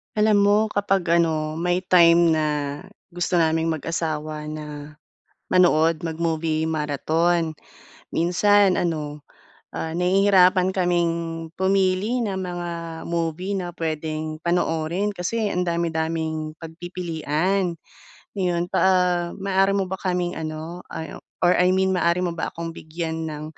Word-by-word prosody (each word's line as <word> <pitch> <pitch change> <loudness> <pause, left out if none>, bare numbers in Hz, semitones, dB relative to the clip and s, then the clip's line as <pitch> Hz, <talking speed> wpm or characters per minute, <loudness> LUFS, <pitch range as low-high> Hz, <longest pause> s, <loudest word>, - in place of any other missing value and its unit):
Alam 210 -1 +4
mo, 205 +1 +5
kapag 195 -3 0
ano, 160 -2 +1
may 175 +2 0
time 170 -2 +5
na, 155 -1 +1 0.6
gusto 175 0 -1
naming 160 0 +2
mag-asawa 155 -1 -3
na 150 -1 -7 0.6
manood, 165 -2 +3
mag-movie 160 -1 -1
marathon, 160 +2 0 0.5
minsan 195 +3 +3
ano, 150 -4 -2 0.5
ah, 160 - -4
nahihirapan 185 0 +4
kaming 175 -3 +1 0.4
pumili 190 +5 +1
ng 200 -4 -2
mga 175 -2 -4 0.4
movie 170 +4 -2
na 175 -2 -4
puwedeng 155 -1 -3
panoorin 170 +2 0
kasi 205 +3 -2
ang 180 -1 -1
dami-daming 160 -2 -2
pagpipilian, 175 +1 -2 0.7
Iyon 175 -2 0
pa - - 0
ah, 180 -2 +3
maaari 195 0 +1
mo 195 -2 -1
ba 190 - -3
kaming 180 -2 -2
ano, 160 +2 -6
ah, 160 - -7 0.2
or 175 0 +5
I 180 +1 +4
mean 190 0 +2
maaari 170 0 +1
mo 180 - 0
ba - - -2
akong 165 0 -6
bigyan 160 0 -5
ng 150 -1 -6
170 Hz, 120 wpm, -23 LUFS, 160-185 Hz, 0.7 s, mo